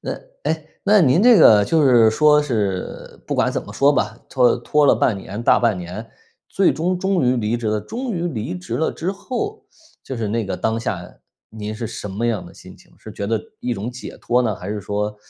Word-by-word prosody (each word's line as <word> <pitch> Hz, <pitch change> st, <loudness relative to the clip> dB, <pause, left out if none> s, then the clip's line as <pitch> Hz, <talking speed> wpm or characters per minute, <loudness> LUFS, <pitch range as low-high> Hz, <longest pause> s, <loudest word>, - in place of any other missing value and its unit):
那 -, -, -4 dB, 0.3 s
哎， 160 Hz, -1 st, -2 dB, 0.2 s
那 205 Hz, +1 st, +5 dB
您 160 Hz, +3 st, +4 dB
这 245 Hz, 0 st, +7 dB
个 105 Hz, -9 st, +7 dB
就 160 Hz, +7 st, +2 dB
是 120 Hz, -4 st, +6 dB
说 150 Hz, +5 st, +4 dB
是 105 Hz, -9 st, -3 dB
不 -, -, -2 dB
管 -, -, +2 dB
怎 -, -, -3 dB
么 -, -, -11 dB
说 140 Hz, +1 st, +3 dB
吧， -, -, -1 dB
拖 125 Hz, -3 st, +3 dB
拖 145 Hz, +5 st, +1 dB
了 -, -, +6 dB
半 110 Hz, -, +1 dB
年 100 Hz, +3 st, -7 dB
大 -, -, +4 dB
半 115 Hz, -5 st, +1 dB
年， 90 Hz, +6 st, -7 dB, 0.4 s
最 195 Hz, -, +2 dB
终 180 Hz, +3 st, -1 dB
终 190 Hz, -2 st, 0 dB
于 125 Hz, +1 st, +2 dB
离 115 Hz, 0 st, 0 dB
职 120 Hz, -1 st, -5 dB
了， 105 Hz, 0 st, 0 dB
终 240 Hz, -, -5 dB
于 175 Hz, -1 st, -2 dB
离 110 Hz, -, -4 dB
职 90 Hz, +6 st, -6 dB
了 160 Hz, -, 0 dB
之 175 Hz, +4 st, -3 dB
后， 335 Hz, -, -5 dB, 0.4 s
就 130 Hz, -, -6 dB
是 110 Hz, -3 st, -2 dB
那 115 Hz, +2 st, -1 dB
个 95 Hz, -, -3 dB
当 110 Hz, 0 st, -1 dB
下， 90 Hz, -6 st, -5 dB, 0.4 s
您 110 Hz, -1 st, -6 dB
是 115 Hz, +1 st, -5 dB
什 105 Hz, -, -7 dB
么 100 Hz, +4 st, -4 dB
样 115 Hz, -3 st, -1 dB
的 -, -, -14 dB
心 -, -, -14 dB
情？ -, -, -22 dB
是 -, -, -11 dB
觉 100 Hz, -, -5 dB
得 110 Hz, 0 st, 0 dB, 0.2 s
一 125 Hz, -1 st, -2 dB
种 110 Hz, +3 st, -4 dB
解 125 Hz, +1 st, -9 dB
脱 125 Hz, +1 st, +1 dB
呢？ 110 Hz, -4 st, 0 dB
还 90 Hz, 0 st, -8 dB
是 105 Hz, 0 st, -3 dB
说 105 Hz, +1 st, -3 dB
120 Hz, 245 characters per minute, -20 LUFS, 105-155 Hz, 0.4 s, 这